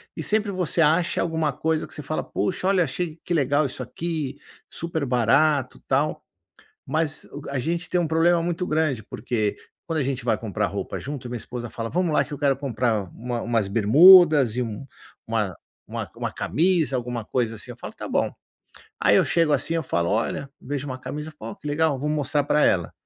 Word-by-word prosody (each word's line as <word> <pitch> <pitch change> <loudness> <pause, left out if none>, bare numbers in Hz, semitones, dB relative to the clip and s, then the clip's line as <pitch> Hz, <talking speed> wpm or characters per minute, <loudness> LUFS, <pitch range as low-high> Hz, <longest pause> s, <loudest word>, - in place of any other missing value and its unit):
e - - -4
sempre 215 -1 +1
você 180 -2 -1
acha 165 +3 +3
alguma 160 -3 0
coisa 160 +4 -1
que - - -12
você 150 - -5
fala: 155 - -3
"puxa, 185 0 -2
olha 190 -3 +4
achei, 160 +3 -4
que 175 - -1
legal 145 0 +2
isso 130 -1 -4
aqui, 145 +1 -4 0.3
super 160 -3 -2
barato, 130 +3 +2
tal". 140 +3 0 0.6
Mas 155 -1 0
uga 140 -1 -9
a 135 - -1
gente 170 +5 -2
tem 175 -2 +1
problema 165 +2 +3
muito 175 +1 -2
grande, 155 - 0
porque 110 -1 -2 0.3
quando 160 -2 -1
a - - +1
gente 130 -2 -3
vai 110 -3 +2
comprar 105 -2 -2
roupa 100 +2 -4
junto, 135 -3 -6
minha 120 - -3
esposa 120 0 -6
fala: 115 0 -5
"vamos 175 -1 0
lá - - +4
que 150 - -9
eu - - -4
quero 140 -3 +2
comprar 120 -6 0
uma 120 0 -4
umas 115 -4 0
bermudas 140 - +7
e 125 - +1
um 115 +4 -6 0.4
uma 105 -5 -1 0.3
uma - - -5
uma - - -3
camisa 160 -5 +1
alguma 120 -2 -3
coisa 115 -1 -1
assim", - - -7
eu - - -11
falo: - - -8
"tá - - -7
bom". - - 0 0.7
Aí - - +5
eu - - +5
chego 165 -3 +2
assim 165 - 0
eu 165 - 0
falo: 85 -8 0
"olha", 115 +6 -1
vejo 145 +1 -4
uma 130 - -4
camisa, 150 +3 -6
"ó, 205 - -7
que 175 - -22
legal 150 -1 +1
vou 150 +3 -2
mostrar 145 -1 0
pra 150 +1 +2
ela!". 90 -4 +2
145 Hz, 200 wpm, -24 LUFS, 120-160 Hz, 0.7 s, bermudas